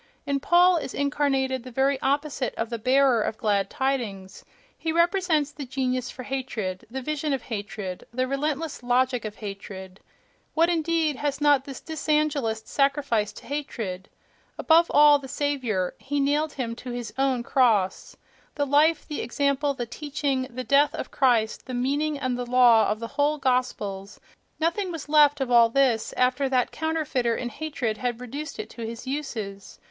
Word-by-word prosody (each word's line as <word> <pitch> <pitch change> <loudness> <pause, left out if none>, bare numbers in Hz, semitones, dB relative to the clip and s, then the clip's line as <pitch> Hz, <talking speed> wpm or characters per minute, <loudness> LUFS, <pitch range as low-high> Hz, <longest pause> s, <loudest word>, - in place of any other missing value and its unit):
In 280 -1 0
Paul 350 +4 +5
is 290 - -5
incarnated 270 -3 0
the 255 - -9
very 265 +2 +1
opposite 285 -2 -1
of 225 +1 -3
the 235 - -3
"bearer 255 0 +3
of 215 - -2
glad 205 -3 +1
tidings"; 230 -9 -3 0.3
he 325 - -3
represents 340 -3 +2
the 290 - -7
genius 255 -1 -2
for 255 - -8
hatred, 235 -9 -4
the 265 +2 -5
vision 305 +1 -1
of 265 - -2
hatred, 205 -4 -6
the 255 +2 -1
relentless 295 +2 -2
logic 250 0 +1
of 215 0 -5
hatred. 195 -2 -8 0.6
What, 330 +2 +4
indeed, 325 -3 0
has 290 0 -2
not 290 -2 +4
this 275 -2 -7
dysangelist 300 -8 -1
sacrificed 275 -7 0
to - - -12
hatred! 225 -10 -5 0.5
Above 335 +1 +4
all, 295 0 +6
the 270 - -9
Saviour: 260 -10 -1
he 285 +1 -2
nailed 290 +2 +1
him 235 -4 -3
to 250 - -8
his 240 -3 -5
own 265 -2 +1
cross. 220 -8 +1 0.4
The 285 - 0
life, 295 +3 +3
the 300 - -4
example, 280 +3 0
the 240 - -3
teaching, 275 0 -2
the 255 +1 -6
death 280 +2 +3
of - - -6
Christ, 235 -4 +1
the 255 - -4
meaning 285 +4 0
and 255 -3 -1
the 245 - -4
law 240 -3 +5
of 215 - -1
the 230 - -5
whole 300 +1 +2
gospels—nothing 255 - -2
was 325 -4 -6
left 295 -1 +5
of 265 -2 -2
all 235 -1 +6
this 250 -3 +2
after 255 +2 +2
that 255 -2 +1
counterfeiter 305 -7 -1
in 240 - -3
hatred 245 -4 -3
had 245 -2 -2
reduced 280 +5 -6
it 435 - -6
to 235 - -10
his 230 +2 -6
uses. 220 -8 -5
265 Hz, 165 wpm, -25 LUFS, 235-290 Hz, 0.6 s, all